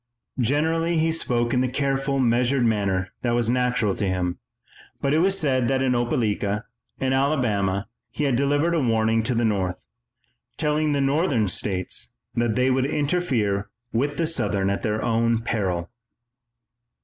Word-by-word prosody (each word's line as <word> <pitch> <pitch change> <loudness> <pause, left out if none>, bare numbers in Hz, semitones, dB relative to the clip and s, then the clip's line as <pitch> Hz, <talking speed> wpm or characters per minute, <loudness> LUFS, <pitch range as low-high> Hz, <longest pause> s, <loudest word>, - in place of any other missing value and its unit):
Generally 160 +7 +1
he 160 +1 +2
spoke 120 -7 0
in 125 - +2
the 130 - +1
careful, 135 +1 -1
measured 125 +1 +2
manner 95 -4 0
that 120 -1 0
was 120 -1 +1
natural 125 -4 +1
to 100 - -2
him, 90 -1 -1 0.6
but 140 0 0
it 155 - +3
was 195 +3 +2
said 130 -6 +1
that 135 +1 +1
in 130 -1 +2
Opelika, 110 -4 0 0.4
in 130 0 0
Alabama, 110 -9 +1 0.2
he 150 - -4
had 135 -4 +2
delivered 145 +5 +1
a 165 - +2
warning 115 -2 +2
to 120 +2 -1
the 115 0 +1
North, 95 -4 -1 0.7
telling 150 0 +1
the 140 - +1
Northern 135 - +1
states 95 0 -1 0.2
that 120 -2 0
they 130 +1 +2
would 130 +1 +1
interfere 140 - 0 0.2
with 145 +5 0
the 165 - +1
Southern 100 -11 0
at 100 - -2
their 105 -1 -1 0.5
peril. 95 -6 -1
125 Hz, 155 wpm, -24 LUFS, 105-140 Hz, 0.7 s, it